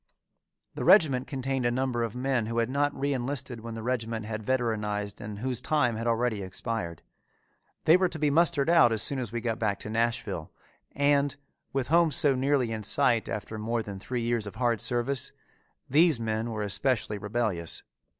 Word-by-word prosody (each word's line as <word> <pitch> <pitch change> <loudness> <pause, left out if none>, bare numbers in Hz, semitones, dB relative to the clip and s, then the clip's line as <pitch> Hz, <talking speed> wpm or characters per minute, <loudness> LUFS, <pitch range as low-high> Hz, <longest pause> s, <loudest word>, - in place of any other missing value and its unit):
The - - -4
regiment 135 -10 +5
contained 135 -1 -2
a 120 - +3
number 125 -1 -1
of 115 -1 -2
men 125 -3 0
who 115 +1 -3
had 115 +1 +1
not 145 +1 +1
reënlisted 135 -2 -2
when 115 0 -7
the 110 - -6
regiment 115 -2 -2
had 110 0 -4
veteranized 105 -4 -1
and 105 0 -6
whose 125 +2 -1
time 125 -7 +1
had 115 +2 -3
already 115 -2 +1
expired. 95 -3 -4 0.8
They 165 +3 +7
were 185 -1 +2
to 165 - -4
be 150 -1 +1
mustered 160 -2 +2
out 165 -8 +6
as 110 -1 +2
soon 140 - 0
as 120 -5 -4
we 120 0 -3
got 115 -2 -2
back 105 -3 0
to 105 - -6
Nashville 115 -7 -1 0.4
and, 140 0 +2 0.4
with 135 -1 -2
home 170 +1 +5
so 145 0 +3
nearly 130 -2 +1
in 110 -1 -3
sight 120 +1 +2
after 110 +1 -5
more 115 +1 -1
than 100 -2 -7
three 120 +3 -3
years 115 -2 -1
of 100 - -8
hard 120 -3 +1
service, 125 +2 -1 0.5
these 155 -1 +4
men 110 0 -2
were 110 -2 -3
especially 105 0 0
rebellious. 105 -5 -2
120 Hz, 185 wpm, -28 LUFS, 110-135 Hz, 0.8 s, They